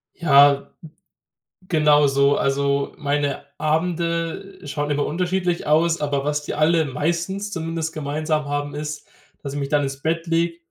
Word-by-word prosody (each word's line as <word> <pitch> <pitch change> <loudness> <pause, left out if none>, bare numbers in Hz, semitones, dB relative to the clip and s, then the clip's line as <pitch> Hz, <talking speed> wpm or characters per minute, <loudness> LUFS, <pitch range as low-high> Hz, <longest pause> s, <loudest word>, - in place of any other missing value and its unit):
Ja, 140 -4 +5 1.0
genau 150 -3 +4
so. 140 +1 +3
Also, 140 0 0
meine 145 -1 -1
Abende 170 +3 -1
schauen 145 0 -3
immer 145 0 0
unterschiedlich 180 +1 -1
aus. 165 +2 +3
Aber 145 -2 -1
was 150 0 -1
die - - -4
alle 160 +1 +3
meistens 170 +9 -2
zumindest 165 -2 -3
gemeinsam 155 +1 -2
haben, 145 0 -3
ist, 150 0 -5 0.4
dass 140 -2 -5
ich 145 - -3
mich 140 -1 -3
dann 145 0 +2
ins 135 0 -4
Bett 165 +2 -1
lege 165 0 0
150 Hz, 145 wpm, -22 LUFS, 145-165 Hz, 1.0 s, Ja